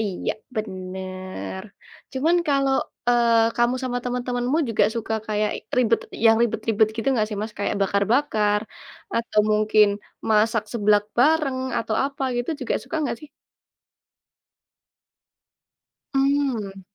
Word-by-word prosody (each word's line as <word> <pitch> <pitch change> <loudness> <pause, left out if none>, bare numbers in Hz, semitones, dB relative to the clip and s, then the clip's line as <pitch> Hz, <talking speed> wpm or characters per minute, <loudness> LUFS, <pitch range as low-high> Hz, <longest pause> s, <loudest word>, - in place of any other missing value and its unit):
Iya, 200 -5 -2 0.2
bener. 185 -2 -5 0.5
Cuman 315 +7 +2
kalau, 275 -1 +2 0.4
eee, 230 -1 +4
kamu, 240 +1 +2
sama 250 -1 -1
temen-temenmu 245 +3 -1
juga, 215 -2 +3
suka 225 -1 -2
kayak 210 0 0 0.3
ribet 230 -2 +3 0.3
yang 225 0 +6
ribet-ribet 220 -1 +1
gitu 225 - -4
gak 215 - +2
sih, 210 - -5
Mas? 215 0 -4
Kayak 200 - -1
bakar-bakar 210 +1 +2 0.6
atau 230 -2 +2
mungkin 215 0 +4 0.4
masak 220 +1 +3
seblak 210 -2 +3
bareng 290 -1 +3 0.2
atau 220 - -2
apa 275 0 -4
gitu, 245 +6 -2
juga 255 - -1
suka 325 - -5
nggak, 235 -4 -2
sih? 305 - -11 2.9
Mmm. 270 -8 0
225 Hz, 115 wpm, -23 LUFS, 210-250 Hz, 2.9 s, yang